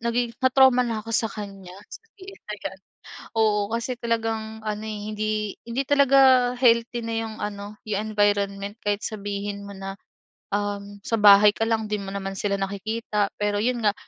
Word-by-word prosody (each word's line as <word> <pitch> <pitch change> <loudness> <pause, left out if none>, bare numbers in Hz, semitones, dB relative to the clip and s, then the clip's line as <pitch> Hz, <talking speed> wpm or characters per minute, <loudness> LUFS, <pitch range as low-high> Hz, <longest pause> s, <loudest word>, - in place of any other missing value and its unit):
nagiging 235 +1 -1
na-trauma 260 -1 +5
na 225 -2 -2
ako 230 - -7
sa 225 -1 +2
kanya, 195 -3 -8 0.2
sa - - -10 0.2
TL 390 0 -12
na 210 - -3
'yan. 190 0 -5 0.6
Oo, 215 -2 +3 0.2
kasi 235 +2 -3
talagang 225 -1 -2
ano, 210 -1 -3
eh, 215 -1 -5
hindi 215 0 -2 0.4
hindi 240 +4 -1
talaga 270 -3 +5
healthy 235 -1 +3
na 230 0 -3
'yung 225 -1 -5
ano 205 0 -5
'yung 215 +1 -2
environment 200 -1 +1
kahit 205 0 0
sabihin 205 -1 -4
mo 200 - -8
na 195 0 -6 0.6
um, 205 0 -4
sa 230 - 0
bahay 205 0 +8
ka 225 - 0
lang, 225 -1 +1
'di 210 -1 -1
mo 195 - -7
naman 195 -1 -4
sila 200 0 0
nakikita, 205 +1 -2
pero 205 0 +1
'yun 240 0 0
nga, 205 - +4
215 Hz, 175 wpm, -24 LUFS, 205-230 Hz, 0.6 s, bahay